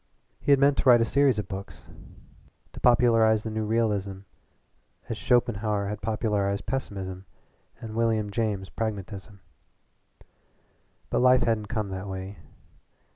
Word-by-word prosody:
He - - 0
had 140 - +6
meant 140 0 +3
to 135 - +3
write 120 -1 +8
a 115 - +2
series 135 0 +2
of 105 - -3
books, 95 0 -8 0.9
to - - -9
popularize 115 -3 +4
the 110 - -4
new 110 0 -2
realism 105 -4 -1 0.9
as 115 - -2
Schopenhauer 105 -4 0
had 105 - -5
popularized 105 -2 -1
pessimism 95 -7 -5 0.5
and 110 -1 -8
William 110 -2 0
James 105 -4 -2
pragmatism. 100 0 -6 1.7
But - - +1
life 125 0 +5
hadn't 110 -2 0
come 110 -3 -3
that 95 +1 -6
way. 95 +1 -7
110 Hz, 130 wpm, -26 LUFS, 100-115 Hz, 1.7 s, write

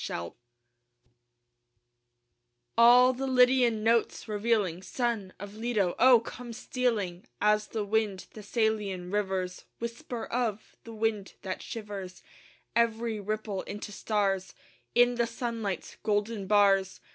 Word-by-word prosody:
APOLLO 85 0 -5 0.7
I - - -37 1.7
All 245 +2 +7
the 270 +2 -3
Lydian 250 -3 +4
notes 230 +1 +1
revealing, 210 -5 0
Son 230 -3 -2
of 205 +1 -8
Leto, 215 -5 0
oh, 250 -1 +8
come 240 0 -8
stealing 220 -7 -2
As 210 0 +2
the 215 -2 -3
wind 205 -2 0
Thessalian 210 -4 -1
rivers 190 -3 -2
Whisper 235 +1 -5
of! 230 -4 -3
the 230 - -9
wind 215 -3 -1
that 185 -1 -4
shivers 200 -4 -7 0.5
Every 230 -1 +1
ripple 210 -1 -3
into 205 +1 -7
stars, 195 -2 -1 0.4
In 245 0 +5
the 235 - +1
sunlight's 230 -4 -4
golden 210 -1 -1
bars. 195 -2 +3
215 Hz, 115 wpm, -29 LUFS, 200-235 Hz, 1.7 s, oh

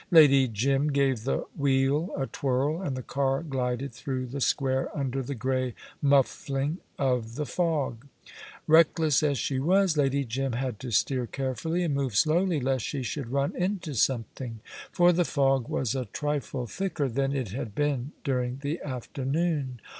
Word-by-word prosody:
Lady 140 -6 +7
Jim 135 +6 +1
gave 135 -5 +1
the 135 - 0
wheel 140 +4 +2
a 135 - 0
twirl, 140 +6 -1
and 140 -8 -3
the 130 - -5
car 135 +3 0
glided 130 -3 -2
through 130 +1 -3
the 135 +3 -5
square 130 +2 +1
under 135 -1 -1
the 135 +2 -4
grey 130 0 -1 0.3
muffling 140 +2 +1 0.2
of 125 -4 0
the 150 - -2
fog. 145 -8 -1 0.6
Reckless 160 -2 +4
as 145 -2 +1
she 130 +2 -1
was, 185 +4 +3
Lady 140 -1 +2
Jim 130 +2 -2
had 125 -3 -3
to 130 - -6
steer 125 +3 +1
carefully 135 +7 -2
and 160 -4 0
move 135 -5 -1
slowly, 165 - +3
lest 130 -2 0
she 140 -3 -3
should 125 -1 -4
run 140 +1 0
into 180 -4 -2
something, 120 -1 -1 0.3
for 175 -1 +5
the 175 +1 +3
fog 135 -5 +1
was 130 -2 0
a 130 -2 -2
trifle 140 +1 -3
thicker 155 - -2
than 135 +2 0
it 130 -6 -2
had 110 -1 -5
been 145 -2 0
during 125 -3 -1
the 150 +4 -2
afternoon. 135 +1 -2
135 Hz, 160 wpm, -27 LUFS, 130-150 Hz, 0.6 s, Lady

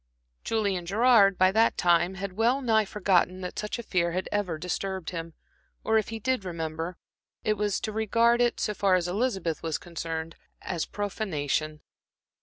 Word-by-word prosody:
Julian 200 -6 -1
Gerard, 205 -2 +5
by 185 0 +5
that 225 +3 +3
time, 175 +1 +3
had 195 0 -5
well 235 +6 +2
nigh 220 -3 +3
forgotten 185 -2 +1
that 180 - -5
such 210 +3 -3
a 235 - -6
fear 170 -5 0
had 185 +1 -2
ever 195 -6 -1
disturbed 180 +1 -3
him, 165 -2 -6 0.5
or 220 0 +3
if 215 - -4
he 225 - -4
did 255 0 -1
remember 165 -1 -4 0.5
it, - - -2
it - - +4
was 210 -1 -1
to 215 - -3
regard 230 +2 +2
it, 240 -1 +1
so 210 - 0
far 195 -2 +3
as 175 -1 0
Elizabeth 190 -5 -1
was 160 -2 -2
concerned, 165 -1 -5 0.3
as 170 -3 -3
profanation. 155 -7 -2
190 Hz, 175 wpm, -27 LUFS, 170-215 Hz, 0.5 s, Gerard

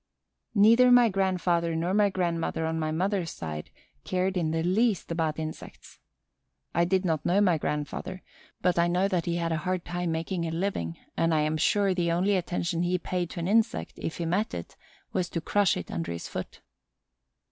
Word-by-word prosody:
Neither 230 +5 +6
my 245 -2 +7
grandfather 180 -4 +1
nor 170 +3 0
my 205 0 +4
grandmother 170 -3 -1
on 160 0 -1
my 155 -1 -1
mother's 180 +1 0
side 75 - -6 0.3
cared 185 +1 -1
in 170 -3 0
the 160 0 0
least 195 +1 +1
about 160 -2 -1
insects. 155 0 -8 0.7
I 170 +1 +3
did 190 +1 +1
not 160 -3 0
know 185 +3 +2
my 180 -6 +3
grandfather, 150 +5 -4 0.4
but 180 -1 +2
I 170 - +4
know 180 +3 +2
that 180 -3 -1
he 170 - 0
had 170 -1 -1
a 160 - +1
hard 180 +3 -2
time 175 -1 -2
making 170 +1 -2
a - - -2
living, 165 - -2 0.2
and 165 -1 +2
I 155 - +3
am 155 +1 0
sure 195 +5 +2
the 175 -2 0
only 185 +4 +2
attention 175 -1 -1
he 180 +1 +1
paid 180 -1 -3
to 175 - -6
an 170 - -2
insect, 225 +3 +1
if 160 - -4
he 170 - -2
met 185 +6 0
it, 85 - -7 0.4
was 180 -1 0
to 170 - -2
crush 200 +3 +2
it 90 - -6
under 85 +1 -3
his 85 0 -5
foot. - - -7
175 Hz, 195 wpm, -28 LUFS, 160-190 Hz, 0.7 s, my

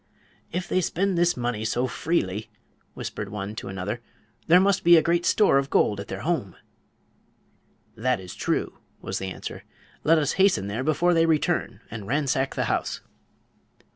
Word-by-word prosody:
"If 180 +1 -3
they 185 - +1
spend 190 +3 0
this 175 0 +2
money 120 -3 -2
so 120 +3 0
freely," 110 - -1 0.5
whispered - - -5
one 105 0 -5
to - - -5
another, 95 +5 -4 0.5
"there 175 +2 +7
must 195 0 +2
be 170 0 +8
a - - +6
great 170 +1 +1
store 200 -10 +4
of 140 0 -3
gold 105 -6 +2
at 100 - -6
their - - -5
home." 155 - -2 1.4
"That 125 +1 0
is 90 -1 -9
true," - - -2 0.2
was 95 - -4
the 95 - -4
answer. - - -7 0.4
"Let 165 +2 +5
us 150 -2 +1
hasten 190 - +4
there 105 +6 -3
before 165 +4 +2
they 165 -1 +3
return 155 -3 0
and 105 -3 -7
ransack 135 0 0
the - - 0
house." - - -1
140 Hz, 170 wpm, -25 LUFS, 105-175 Hz, 1.4 s, be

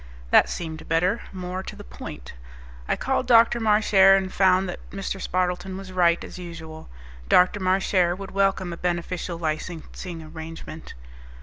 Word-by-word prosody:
That - - +6
seemed 160 -2 -6
better, 180 +7 +2
more 185 0 -5
to - - -8
the - - -10
point. - - -9 0.5
I - - +1
called 265 -1 -1
Dr. 235 0 +5
Marchare 210 -3 +5
and 190 -1 -3
found 190 0 +3
that 180 - -5
Mr. 195 0 -5
Spardleton 185 +1 -1
was 195 -1 -9
right, 175 -2 +3
as - - -9
usual. 160 - -9 0.4
Dr. 180 +3 +5
Marchare 185 -2 +2
would 195 -1 -8
welcome 195 -2 +1
a - - -7
beneficial 175 0 -3
licensing 165 +1 -5
arrangement. 160 0 -9
180 Hz, 145 wpm, -24 LUFS, 170-195 Hz, 0.5 s, That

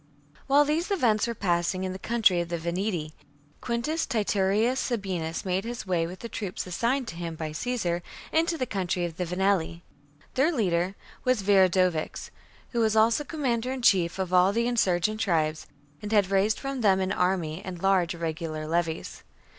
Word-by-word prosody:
While 285 +2 +5
these 310 +4 0
events 240 - +2
were 235 - -3
passing 175 -1 0
in 185 0 -2
the 190 - -7
country 205 -6 +2
of 170 - -5
the 170 - -2
Veneti, 170 -1 -2 0.5
Quintus 250 +7 -1
Titurius 215 +1 +1
Sabinus 185 -9 -2
made 185 +1 0
his 235 0 -5
way 175 -3 0
with 180 +2 -9
the 235 - -5
troops 200 -5 -4
assigned 235 +8 -1
to - - -7
him 170 -1 -5
by 155 -1 -4
Caesar 175 -1 -2 0.3
into 330 +1 +1
the 255 - -1
country 185 -5 -1
of 165 -1 -6
the 180 - -1
Venelli. 180 -2 0 0.5
Their 275 +6 +3
leader 185 - 0 0.3
was 255 -5 +1
Viridovix, 185 -4 +2 0.4
who 240 - -1
was 220 -1 +2
also 225 +6 +4
commander 255 -5 -1
in 260 -2 -4
chief 180 -5 +3
of 185 -1 -3
all 180 +1 +5
the 230 +3 0
insurgent 215 -3 +1
tribes, 160 -7 0 0.3
and 210 - -6
had 200 -3 +3
raised 200 +3 +2
from 275 -2 -4
them 195 -3 +4
an 190 0 -1
army 180 -4 0
and 185 -2 -6
large 190 -2 +2
irregular 160 -1 -4
levies. 165 0 -2
190 Hz, 175 wpm, -27 LUFS, 175-235 Hz, 0.5 s, While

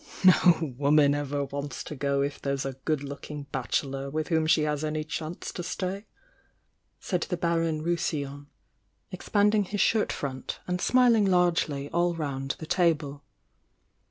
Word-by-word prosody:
No 170 -5 +5
woman 145 0 +4
ever 145 0 -2
wants 140 -2 -5
to 150 - -7
go 140 0 0
if 145 +1 -4
there's 140 -1 -2
a 135 - -3
good 145 +2 -2
looking 145 +1 -7
bachelor 135 +1 -2
with 155 +3 -3
whom 160 -2 +2
she 155 -1 +4
has 150 0 -1
any 155 0 -1
chance 155 +2 -5
to - - -5
stay! 190 +4 -4 0.9
swd 180 -3 -2
the 180 - -2
Baron 165 -2 0
Rousillon, 145 -4 -2 0.6
expanding 210 -1 +2
his 205 +2 -4
shirt 220 +1 +3
iront 130 -2 -4
and 180 0 -2
smihng 235 -2 +4
largely 170 -6 +2
all 175 0 +1
round 135 -4 -3
the 160 - -7
table. 155 -5 +1
155 Hz, 150 wpm, -27 LUFS, 140-175 Hz, 0.9 s, No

